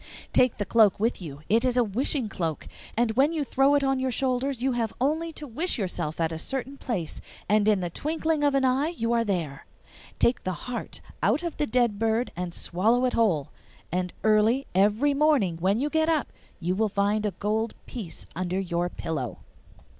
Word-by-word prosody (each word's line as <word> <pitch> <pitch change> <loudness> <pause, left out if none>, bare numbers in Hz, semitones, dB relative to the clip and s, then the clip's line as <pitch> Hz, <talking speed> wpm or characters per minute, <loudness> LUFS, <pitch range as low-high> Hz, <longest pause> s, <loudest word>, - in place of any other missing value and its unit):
Take 250 -2 +4
the 205 - -2
cloak 210 -2 +4
with 225 -1 0
you; 150 -3 -8
it 225 +3 +3
is 250 -1 +1
a 245 - +5
wishing 240 +4 +1
cloak, 165 -6 -3 0.3
and 235 -1 +2
when 270 +7 +3
you 315 -3 -1
throw 275 +1 +3
it 285 - +2
on 270 -1 +1
your 260 0 0
shoulders 255 +1 0
you 265 - +2
have 230 -3 -2
only 315 +5 0
to 300 - -7
wish 300 +8 0
yourself 175 -7 -3
at 165 -1 +1
a 160 - -4
certain 270 +7 -3
place, 200 - -4 0.3
and 210 0 +3
in 210 -3 +3
the 175 -1 -3
twinkling 315 - -1
of 285 -1 +3
an 270 -1 +3
eye 260 +4 +2
you 235 -9 -1
are 230 -1 +3
there. 170 -10 -3 0.5
Take 240 - +2
the 185 - -1
heart 245 -3 -5 0.2
out 215 - +2
of 340 -2 -4
the 295 - 0
dead 235 -3 +1
bird 225 +2 +1
and 180 0 -4
swallow 220 +10 +1
it 250 - 0
whole, 175 -12 +1 0.4
and 180 +1 -1
early 220 +5 +3
every 210 +10 +3
morning 280 - +2
when 190 +6 +1
you 285 - 0
get 315 +1 +1
up 315 -3 0 0.3
you 180 0 -1
will 215 +3 +1
find 205 +1 +1
a 210 - +1
gold 220 +2 -1
piece 210 -10 -7
under 185 +1 -1
your 175 -2 -1
pillow. 145 -9 -4
225 Hz, 200 wpm, -26 LUFS, 185-270 Hz, 0.5 s, a